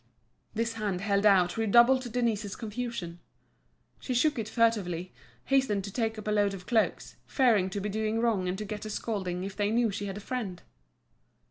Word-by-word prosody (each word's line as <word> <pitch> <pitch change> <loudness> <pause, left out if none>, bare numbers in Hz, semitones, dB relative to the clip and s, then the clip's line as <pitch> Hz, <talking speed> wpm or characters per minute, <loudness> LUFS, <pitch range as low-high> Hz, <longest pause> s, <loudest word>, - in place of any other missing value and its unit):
This 230 +1 -1
hand 205 -5 -2
held 200 0 +2
out 185 -2 +4
redoubled 240 +3 +4
Denise's 220 -5 -1
confusion; 215 -6 -5 0.8
she 255 - -3
shook 290 +1 +2
it 215 -1 -4
furtively, 195 -7 0 0.3
hastening 265 -8 +2
to 200 - -6
take 225 0 -1
up 215 - -7
a - - +1
load 205 -1 +2
of 180 -2 -11
cloaks, 225 0 0
fearing 225 -8 +3
to 200 - -4
be 200 - -3
doing 215 +2 -1
wrong 220 -6 +1
and 180 +1 -2
to 210 - -4
get 210 0 -6
a 215 - -5
scolding 190 -5 -3
if 195 0 -6
they 205 -1 0
knew 230 0 +2
she 200 +1 -4
had 195 0 -5
a - - -5
friend. 205 -5 -5
210 Hz, 190 wpm, -29 LUFS, 195-230 Hz, 0.8 s, out